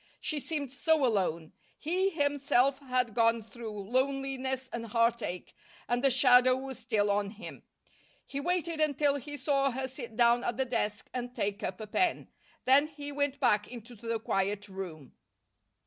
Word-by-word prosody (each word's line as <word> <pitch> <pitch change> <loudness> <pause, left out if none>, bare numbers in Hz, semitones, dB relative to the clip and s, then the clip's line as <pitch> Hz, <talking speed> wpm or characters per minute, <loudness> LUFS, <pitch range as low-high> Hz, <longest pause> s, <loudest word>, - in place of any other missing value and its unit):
She 305 -1 -2
seemed 285 -3 -3
so 315 +1 +2
alone. 180 -8 0 0.2
He 370 +5 +1
himself 285 -4 +2
had 255 -4 -1
gone 230 0 +3
through 220 -2 -7
loneliness 265 +1 -1
and 230 -1 -4
heartache, 230 -4 0 0.3
and 245 +1 0
the 275 - +6
shadow 255 -1 +6
was 265 -1 -6
still 210 -3 +1
on 200 0 0
him. 220 +3 -10 0.6
He 280 - -5
waited 340 +1 -1
until 285 -1 +2
he 290 +2 -7
saw 275 0 +1
her 265 +1 -3
sit 250 -4 -8
down 240 0 +4
at 240 - -2
the 265 - +1
desk 210 -4 -2
and 245 0 -5
take 200 +1 -2
up - - -4
a 215 - -5
pen. 335 - 0 0.4
Then 275 +3 +6
he 290 -1 -8
went 285 -1 -1
back 215 -6 +2
into 240 0 -10
the 230 0 -3
quiet 205 0 -1
room. 180 -7 -8
250 Hz, 165 wpm, -30 LUFS, 225-280 Hz, 0.6 s, the